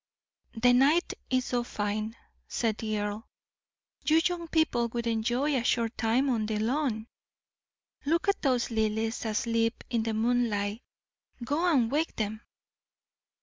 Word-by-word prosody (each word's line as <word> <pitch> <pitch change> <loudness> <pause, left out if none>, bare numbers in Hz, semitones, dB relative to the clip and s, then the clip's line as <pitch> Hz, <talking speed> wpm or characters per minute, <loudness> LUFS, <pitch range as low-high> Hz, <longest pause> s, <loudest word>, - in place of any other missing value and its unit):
"The 245 +2 +4
night 285 +8 +4 0.2
is 255 -1 +1
so 245 -1 0
fine," 215 0 -3 0.3
said 225 -3 -1
the 215 -1 -2
earl, 205 +1 -3 0.8
"you 315 +1 +4
young 350 -1 -1
people 315 -8 +2
would 235 0 -4
enjoy 240 +6 +1
a 245 - +1
short 230 -1 +1
time 240 +5 +2
on 225 -5 0
the 215 -1 -1
lawn. 230 0 0 1.0
Look 335 +5 +1
at 400 - +2
those 250 -4 +1
lilies 220 +1 -1
asleep 230 +1 0
in 235 -2 +1
the 220 0 -2
moonlight 220 -2 0 0.6
go 320 +7 +1
and 245 -6 +3
wake 310 +3 0
them. 215 0 -3
235 Hz, 140 wpm, -29 LUFS, 220-265 Hz, 1.0 s, The